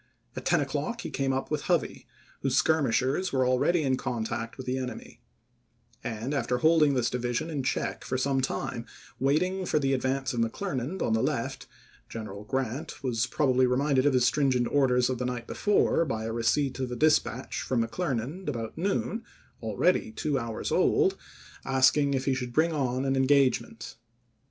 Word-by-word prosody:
About -, -, -6 dB
ten -, -, +4 dB
o'clock -, -, -2 dB
he -, -, -6 dB
came 135 Hz, 0 st, 0 dB
up 135 Hz, +2 st, -2 dB
with 150 Hz, -1 st, -2 dB
Hovey, 175 Hz, -3 st, 0 dB, 0.3 s
whose -, -, 0 dB
skir 160 Hz, 0 st, +3 dB
mishers 135 Hz, +9 st, +1 dB
were 130 Hz, -1 st, +2 dB
already 140 Hz, +7 st, +2 dB
in 130 Hz, -2 st, +1 dB
contact 115 Hz, -1 st, -3 dB
with 130 Hz, -, -7 dB
the 130 Hz, +1 st, -1 dB
enemy; 125 Hz, -3 st, -7 dB, 0.8 s
and, 115 Hz, +5 st, -3 dB
after 125 Hz, -3 st, 0 dB
holding 155 Hz, 0 st, +4 dB
this 125 Hz, -2 st, +1 dB
division 125 Hz, +5 st, -2 dB
in 145 Hz, -3 st, -2 dB
check 130 Hz, -, -2 dB
for 130 Hz, -, -2 dB
some 135 Hz, +1 st, +1 dB
time 120 Hz, -2 st, -3 dB, 0.3 s
waiting 180 Hz, +9 st, +1 dB
for 175 Hz, -, 0 dB
the 135 Hz, -2 st, +1 dB
advance 135 Hz, +1 st, -1 dB
of 120 Hz, -, -2 dB
McCler 135 Hz, -, -2 dB
nand 140 Hz, +10 st, -3 dB
on 110 Hz, -, +1 dB
the 110 Hz, -, +2 dB
left, -, -, -2 dB, 0.4 s
G -, -, -7 dB
eneral 105 Hz, -1 st, -7 dB
Grant 130 Hz, +3 st, -3 dB
was 120 Hz, -3 st, 0 dB
probably 130 Hz, -3 st, +2 dB
re 125 Hz, 0 st, +1 dB
minded 140 Hz, -1 st, +2 dB
of 145 Hz, -, +3 dB
his 125 Hz, -1 st, +4 dB
stringent 130 Hz, -4 st, +2 dB
orders 125 Hz, -3 st, +3 dB
of 130 Hz, -1 st, -2 dB
the 125 Hz, -, -1 dB
night 125 Hz, -1 st, -3 dB
before 205 Hz, -, +2 dB
by 115 Hz, -8 st, -3 dB
the 115 Hz, 0 st, -3 dB
receipt 130 Hz, +4 st, 0 dB
of 130 Hz, -2 st, -2 dB
a -, -, -2 dB
dispatch 130 Hz, -3 st, +1 dB
from 120 Hz, -3 st, 0 dB
McClernand 150 Hz, +3 st, -3 dB
about 115 Hz, -5 st, -4 dB
noon, 200 Hz, +4 st, -1 dB, 0.4 s
already 110 Hz, -, +1 dB
two 140 Hz, +4 st, -1 dB
hours 115 Hz, -2 st, -4 dB
old, -, -, +3 dB, 0.5 s
asking 135 Hz, +2 st, +3 dB
if 130 Hz, 0 st, -2 dB
he 135 Hz, -, +2 dB
should 125 Hz, -2 st, -4 dB
bring 160 Hz, +3 st, +2 dB
on 130 Hz, -3 st, -1 dB
an 135 Hz, 0 st, +1 dB
engagement. 135 Hz, 0 st, +1 dB
130 Hz, 185 wpm, -28 LUFS, 120-145 Hz, 0.8 s, ten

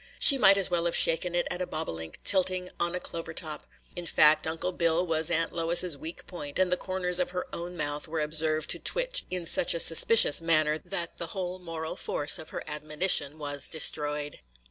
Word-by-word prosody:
She 275 Hz, -2 st, +7 dB
might 195 Hz, -3 st, +5 dB
as 195 Hz, -2 st, +1 dB
well 170 Hz, -1 st, -1 dB
have 170 Hz, -, -1 dB
shaken 170 Hz, +2 st, +1 dB
it 175 Hz, -, -1 dB
at 180 Hz, -, -5 dB
a 180 Hz, -, -3 dB
bobolink 80 Hz, -, -7 dB
tilting 185 Hz, -1 st, +3 dB
on 170 Hz, +1 st, -1 dB
a -, -, -3 dB
clover 165 Hz, -2 st, -8 dB
top. 155 Hz, -4 st, -6 dB, 0.3 s
In 175 Hz, -1 st, -7 dB
fact, 155 Hz, 0 st, +3 dB
Uncle 165 Hz, +3 st, -3 dB
Bill 170 Hz, 0 st, -1 dB
was 160 Hz, -2 st, +1 dB
Aunt 165 Hz, -1 st, -1 dB
Lois's 170 Hz, 0 st, +2 dB
weak 160 Hz, +4 st, -8 dB
point, 145 Hz, -6 st, -8 dB
and 185 Hz, -1 st, +1 dB
the -, -, +3 dB
corners 180 Hz, -1 st, -4 dB
of 180 Hz, -, -1 dB
her 180 Hz, 0 st, -5 dB
own 175 Hz, +1 st, -7 dB
mouth 145 Hz, 0 st, -4 dB
were 160 Hz, 0 st, -5 dB
observed 155 Hz, 0 st, 0 dB
to -, -, +3 dB
twitch -, -, 0 dB
in 180 Hz, -2 st, -5 dB
such 170 Hz, -, +2 dB
a -, -, -3 dB
suspicious 165 Hz, +1 st, +6 dB
manner 155 Hz, -2 st, +1 dB
that 170 Hz, -2 st, -7 dB
the 170 Hz, -, -5 dB
whole 185 Hz, 0 st, -5 dB
moral 165 Hz, -2 st, -7 dB
force 145 Hz, 0 st, +1 dB
of 160 Hz, -, -11 dB
her -, -, -7 dB
admonition 150 Hz, 0 st, +1 dB
was 145 Hz, -2 st, -3 dB
destroyed. 150 Hz, -2 st, -2 dB
165 Hz, 205 wpm, -27 LUFS, 155-180 Hz, 0.3 s, She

